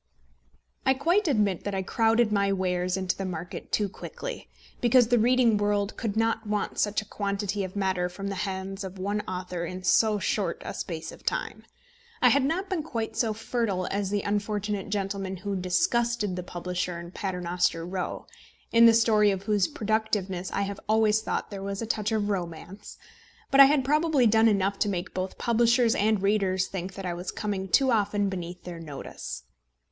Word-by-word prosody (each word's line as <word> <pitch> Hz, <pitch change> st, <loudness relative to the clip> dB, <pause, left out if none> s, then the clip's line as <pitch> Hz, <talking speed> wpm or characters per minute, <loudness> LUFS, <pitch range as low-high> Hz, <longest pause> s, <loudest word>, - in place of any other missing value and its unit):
I 265 Hz, 0 st, +3 dB
quite 345 Hz, +9 st, +2 dB
admit 210 Hz, -, +1 dB
that 205 Hz, -1 st, -3 dB
I 190 Hz, -, -1 dB
crowded 225 Hz, +2 st, +2 dB
my 200 Hz, -1 st, +2 dB
wares 180 Hz, -1 st, 0 dB
into 185 Hz, -2 st, -1 dB
the 195 Hz, -, -4 dB
market 175 Hz, -2 st, -6 dB
too 210 Hz, -, +2 dB
quickly, -, -, -7 dB, 0.3 s
because 240 Hz, -1 st, +4 dB
the 245 Hz, -1 st, +4 dB
reading 240 Hz, -1 st, +4 dB
world 205 Hz, 0 st, 0 dB
could 220 Hz, -2 st, -3 dB
not 225 Hz, -1 st, 0 dB
want 210 Hz, 0 st, -2 dB
such 210 Hz, +1 st, +1 dB
a -, -, -21 dB
quantity 200 Hz, 0 st, -2 dB
of 185 Hz, 0 st, -6 dB
matter 190 Hz, -3 st, 0 dB
from 195 Hz, +2 st, -6 dB
the -, -, -3 dB
hands 195 Hz, 0 st, -4 dB
of 190 Hz, 0 st, -7 dB
one 205 Hz, +3 st, -1 dB
author 180 Hz, -1 st, -4 dB
in 185 Hz, +2 st, -6 dB
so 215 Hz, +2 st, +4 dB
short 200 Hz, -, -1 dB
a -, -, -4 dB
space -, -, -5 dB
of -, -, -14 dB
time. -, -, -3 dB, 0.5 s
I -, -, +6 dB
had 280 Hz, -, +3 dB
not 345 Hz, +8 st, -1 dB
been 375 Hz, -4 st, -1 dB
quite 225 Hz, -7 st, -4 dB
so 225 Hz, -1 st, +1 dB
fertile 215 Hz, -4 st, -2 dB
as 200 Hz, -1 st, -1 dB
the 205 Hz, 0 st, -1 dB
unfortunate 205 Hz, -1 st, -2 dB
gentleman 195 Hz, -1 st, -2 dB
who 200 Hz, +2 st, -3 dB
disgusted 230 Hz, -, +1 dB
the 180 Hz, -, -3 dB
publisher 180 Hz, 0 st, -4 dB
in 170 Hz, 0 st, -9 dB
Paternoster 180 Hz, -3 st, -1 dB
Row, 180 Hz, +1 st, -4 dB, 0.5 s
in 230 Hz, 0 st, +7 dB
the 230 Hz, -, +6 dB
story 220 Hz, -2 st, +4 dB
of 195 Hz, -1 st, -1 dB
whose 205 Hz, -3 st, +2 dB
productiveness 205 Hz, -4 st, -1 dB
I 200 Hz, -, 0 dB
have 200 Hz, 0 st, -4 dB
always 220 Hz, 0 st, +3 dB
thought 220 Hz, -, -3 dB
there 200 Hz, -1 st, -6 dB
was 195 Hz, 0 st, -4 dB
a 230 Hz, -, -2 dB
touch 215 Hz, 0 st, -1 dB
of 215 Hz, -2 st, 0 dB
romance, 180 Hz, +1 st, -5 dB, 0.5 s
but 275 Hz, -, +4 dB
I 275 Hz, -, +12 dB
had 275 Hz, -1 st, +3 dB
probably 300 Hz, -2 st, +3 dB
done 220 Hz, +1 st, +5 dB
enough 200 Hz, -2 st, +1 dB
to 210 Hz, -, +2 dB
make 180 Hz, -3 st, -3 dB
both 185 Hz, 0 st, -4 dB
publishers 235 Hz, 0 st, +3 dB
and 210 Hz, -1 st, +1 dB
readers 195 Hz, -2 st, +2 dB
think 190 Hz, 0 st, -6 dB
that 195 Hz, -, -6 dB
I 175 Hz, -, -1 dB
was 175 Hz, +2 st, -5 dB
coming 200 Hz, -3 st, -3 dB
too 265 Hz, +7 st, +4 dB
often 205 Hz, -2 st, +1 dB
beneath 180 Hz, -1 st, -6 dB
their 175 Hz, -2 st, -7 dB
notice. 150 Hz, -4 st, -7 dB
205 Hz, 190 wpm, -27 LUFS, 185-225 Hz, 0.5 s, I